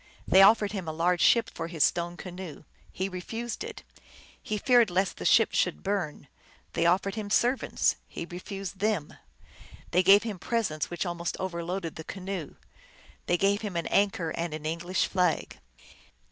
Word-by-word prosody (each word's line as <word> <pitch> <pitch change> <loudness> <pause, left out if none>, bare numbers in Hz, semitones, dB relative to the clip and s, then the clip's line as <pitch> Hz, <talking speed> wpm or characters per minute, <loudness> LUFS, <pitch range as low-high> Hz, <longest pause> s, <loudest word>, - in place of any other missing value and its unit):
They 190 - +7
offered 210 +1 +6
him 190 -5 -5
a - - -1
large 175 +1 +1
ship 230 +5 +5
for 165 - -4
his 165 -3 +1
stone 175 0 0
canoe. 180 -5 -8 0.3
He 190 - -2
refused 225 - -5
it. 455 -1 -8 0.6
He 215 - -3
feared 240 -1 +4
lest 185 +1 0
the - - -6
ship 225 - +5
should 180 - 0
burn. 195 -6 -2 0.5
They - - +2
offered 195 +3 +2
him 210 -1 -5
servants. 245 +5 +2
He - - -6
refused 190 +2 -7
them. 205 -7 -1 0.8
They 180 - +4
gave 195 +3 +7
him 215 -5 -5
presents 195 - -1
which 175 +2 -3
almost 175 -1 -3
overloaded 175 -1 -4
the 160 - -6
canoe. 190 -3 -6 0.7
They 175 - +3
gave 200 +2 +2
him 205 -5 -5
an 170 - -1
anchor 195 -5 +1
and 165 -2 -3
an 155 0 -8
English 170 +3 0
flag. 180 -3 0
185 Hz, 165 wpm, -28 LUFS, 170-205 Hz, 0.8 s, They